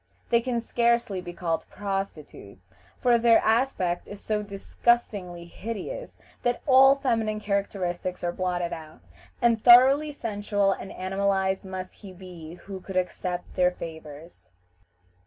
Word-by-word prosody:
They 235 0 +4
can 240 -1 -1
scarcely 235 -4 +1
be 175 -1 -7
called 170 -2 -3
prostitutes, 155 - -6 0.3
for 240 -1 +4
their 230 -1 +6
aspect 220 -7 +1
is 205 - -9
so 210 0 -2
disgustingly 200 -3 -1
hideous 230 - -7 0.2
that 245 0 -1
all 270 -1 +7
feminine 225 -6 -1
characteristics 190 -3 -2
are 175 - 0
blotted 175 -1 -2
out, 155 -1 -10 0.4
and 230 -2 +3
thoroughly 265 +5 +7
sensual 205 -6 -1
and 195 - -5
animalized 190 0 -1
must 185 -1 -7
he 195 -3 -12
be 175 -3 -10
who 190 +1 -9
could 190 0 -5
accept 180 -1 -3
their 180 -1 +3
favors. 160 -2 -10
195 Hz, 130 wpm, -26 LUFS, 180-235 Hz, 0.4 s, all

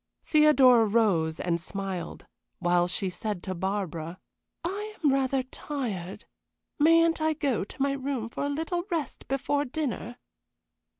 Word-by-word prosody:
Theodora 270 -7 +6
rose 195 -8 +2
and 170 -1 -1
smiled, 190 -2 -5 0.3
while 175 0 +2
she 190 +2 -2
said 185 +1 -4
to 190 - -3
Barbara: 180 -3 -3 0.5
"I 415 +4 -4
am 285 -3 +4
rather 270 -1 +1
tired. 240 - -5 0.5
Mayn't 330 +1 +5
I 315 0 +2
go 280 -8 0
to 205 - -12
my 275 +1 +2
room 270 -4 -2
for 235 - -5
a 285 - 0
little 325 +4 -2
rest 325 -6 -3
before 285 +2 0
dinner?" 250 -5 -4
255 Hz, 135 wpm, -28 LUFS, 190-290 Hz, 0.5 s, Theodora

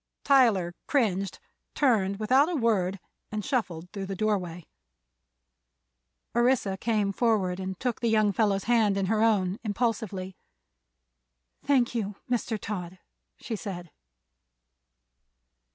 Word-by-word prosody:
Tyler 225 -11 +4
cringed, 200 - 0 0.4
turned 205 -8 +2
without 260 - +3
a 355 - -1
word 200 - +1 0.3
and 210 -1 -3
shuffled 180 -10 -2
through 195 -2 -5
the 195 - -4
doorway. 180 -5 -1 1.7
Orissa 240 -5 +2
came 205 -1 0
forward 195 -6 +1
and 190 -1 -5
took 245 -3 -2
the 235 - +1
young 215 -2 +3
fellow's 200 -2 +1
hand 220 -4 +3
in 195 - +1
her 215 +3 +1
own, 205 -4 +2
impulsively. 205 -4 -2 1.3
"Thank 255 -5 +2
you, 210 -4 -2
Mr. 235 -2 -1
Todd!" 185 -3 -5 0.4
she 230 - -5
said. 180 -5 -7
210 Hz, 115 wpm, -27 LUFS, 190-235 Hz, 1.7 s, Tyler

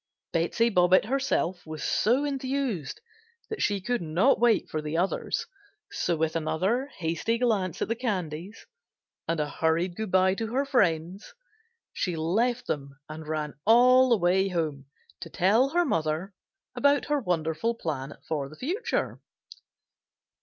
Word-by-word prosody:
Betsey 200 +8 +1
Bobbitt 180 0 +4
herself 210 -8 -1
was 155 -1 -7
so 255 +7 +2
enthused 265 - -2 0.5
that 440 - -4
she 205 -1 +1
could 240 +4 -2
not 170 - +2
wait 235 -1 +3
for 155 - -3
the 150 +2 -3
others, 185 +3 -1 0.5
so 175 - 0
with 160 +1 -1
another 190 - 0
hasty 170 +7 -1
glance 210 -8 0
at - - -3
the 230 - 0
candies 190 -5 -4 0.6
and 165 0 -1
a 150 - 0
hurried 165 +4 0
goodbye 190 -3 +2
to 225 +3 -3
her 275 +1 +2
friends 185 - 0 0.6
she 180 -3 -2
left 225 +10 0
them 140 -1 -4
and 155 0 -8
ran 155 -1 -3
all 250 +3 +6
the 235 - +4
way 190 +1 +2
home 155 -7 -2 0.3
to - - -8
tell 220 +9 +3
mother 165 - -1 0.4
about 285 0 +2
her 295 0 +1
wonderful 175 - -1
plan 145 -8 -5
for 145 -4 -2
the 155 - -12
future. 375 - -2
185 Hz, 140 wpm, -27 LUFS, 160-235 Hz, 0.6 s, all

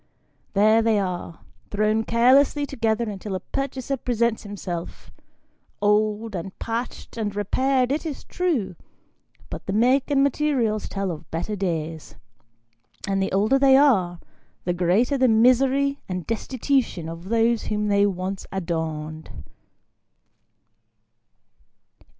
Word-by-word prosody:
There 215 +2 +5
they 225 -1 +2
are, 180 -4 -3 0.3
thrown 215 +2 +1
carelessly 265 +5 +4
together 230 -4 -1
until 200 -1 -5
a - - -2
purchaser 275 +4 -3
presents 235 -2 0
himself, 185 -5 -7 0.7
old, 210 +1 +1
and 185 +2 -6
patched 230 +1 -5
and 210 -3 -2
repaired, 255 +5 +1
it 295 - -1
is 310 -5 -5
true; 300 - -1 0.8
but - - -7
the 195 - -1
make 255 +6 +3
and 275 -1 +3
materials 260 -7 0
tell 195 -2 -2
of 160 -1 -9
better 175 +6 -3
days; 165 -5 -4 0.9
and 195 0 0
the 195 - -1
older 215 +8 +3
they 270 -1 +6
are, 190 -12 +3 0.4
the 175 - 0
greater 195 +11 +2
the 260 - +5
misery 260 +5 +3
and 180 -2 -4
destitution 235 - -1
of 165 +3 -8
those 230 0 +2
whom 210 0 -1
they 200 0 +3
once 190 0 -4
adorned. 160 -4 -4
215 Hz, 120 wpm, -24 LUFS, 190-255 Hz, 0.9 s, they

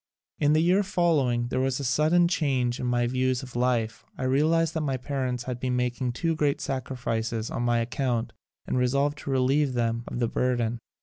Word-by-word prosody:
In 145 0 +3
the 155 +1 +3
year 185 +4 +4
follow 170 -8 +2
ing 120 0 -1
there 130 - -1
was 130 0 0
a - - -4
sudden 155 +7 +3
change 135 -8 0
in 125 - -2
my 120 0 +1
views 130 +1 0
of 125 -2 -10
life. 120 -2 0
I - - -4
realized 155 +5 +2
that 160 - -1
my 135 -3 -1
parents 130 -2 -3
had 125 -1 -5
been 125 0 -1
making 125 0 -1
too 165 +6 -1
great 145 -1 +1
sacrifices 120 -5 -3
on - - -3
my 120 -1 +2
ac 115 - -3
count 125 -4 -1 0.3
and 130 - -1
resolved 140 +4 +1
to - - -7
relieve 135 +1 +2
them 115 -1 0
of - - -5
the 120 -1 +1
burden. 120 -1 0
130 Hz, 205 wpm, -26 LUFS, 120-145 Hz, 0.3 s, year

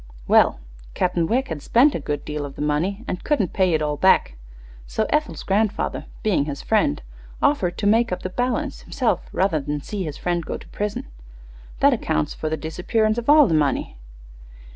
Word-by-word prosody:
Well, - - +4 0.4
Captain 175 -2 +1
Wegg 255 +6 0
had 160 -3 -4
spent 260 - +4
a - - -2
good 145 0 -4
deal 150 -1 -4
of 140 -1 -7
the - - -7
money, 180 +10 -1
and 180 - -4
couldn't 235 - 0
pay 185 -4 +2
it 155 - 0
all 150 -1 -1
back; 185 - +3 0.5
so 220 - -1
Ethel's 300 0 0
grandfather, 205 +1 -1 0.2
being 195 -10 +2
his 145 -2 -5
friend, 70 - +1 0.4
offered 185 -12 +1
to 205 - -3
makeup 220 -2 +2
the 185 - -4
balance 255 +6 -2
himself 250 -4 -1
rather 185 -4 +1
than 145 +1 -3
see 205 +6 -5
his 150 -3 -5
friend 175 -1 -1
go - - -4
to - - -14
prison. 210 0 -3 0.8
That - - +6
accounts 75 -1 -1
for 155 - -4
the 160 - -2
disappearance 215 +9 0
of 235 - -5
all 300 0 +8
the 165 - 0
money." 150 -3 0
180 Hz, 185 wpm, -22 LUFS, 150-225 Hz, 0.8 s, all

